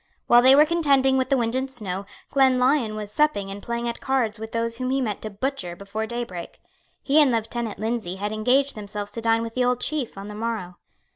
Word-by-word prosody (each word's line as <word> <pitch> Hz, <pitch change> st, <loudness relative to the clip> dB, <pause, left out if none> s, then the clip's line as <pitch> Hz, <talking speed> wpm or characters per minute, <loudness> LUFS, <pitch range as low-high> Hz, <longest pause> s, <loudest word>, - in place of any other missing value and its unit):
While 240 Hz, 0 st, +6 dB
they 260 Hz, +2 st, +8 dB
were 300 Hz, +2 st, +7 dB
contending 280 Hz, -5 st, +3 dB
with 260 Hz, -1 st, 0 dB
the 275 Hz, -, +3 dB
wind 230 Hz, -1 st, 0 dB
and 260 Hz, +1 st, -1 dB
snow, 200 Hz, -6 st, -5 dB, 0.2 s
Glenlyon 260 Hz, -3 st, +3 dB
was 210 Hz, -1 st, -6 dB
supping 210 Hz, -8 st, +1 dB
and 200 Hz, +1 st, -7 dB
playing 235 Hz, +1 st, -3 dB
at 235 Hz, -, -4 dB
cards 240 Hz, -5 st, 0 dB
with 220 Hz, 0 st, -7 dB
those 230 Hz, 0 st, -2 dB
whom 255 Hz, 0 st, -2 dB
he 270 Hz, +1 st, +1 dB
meant 215 Hz, -6 st, -2 dB
to 215 Hz, -, -5 dB
butcher 200 Hz, -4 st, -4 dB
before 200 Hz, +4 st, -5 dB
daybreak. 235 Hz, -8 st, -6 dB, 0.4 s
He 295 Hz, +3 st, +5 dB
and 285 Hz, -3 st, +4 dB
Lieutenant 230 Hz, -1 st, -2 dB
Lindsay 220 Hz, -3 st, -3 dB
had 205 Hz, +2 st, -3 dB
engaged 255 Hz, +6 st, +2 dB
themselves 205 Hz, -1 st, -6 dB
to 230 Hz, -, -6 dB
dine 225 Hz, 0 st, +2 dB
with 230 Hz, 0 st, -6 dB
the 255 Hz, -, +1 dB
old 250 Hz, 0 st, +1 dB
Chief 275 Hz, -6 st, -2 dB
on 195 Hz, +1 st, -7 dB
the 210 Hz, -, -7 dB
morrow. 215 Hz, -5 st, -4 dB
230 Hz, 220 wpm, -24 LUFS, 210-265 Hz, 0.4 s, they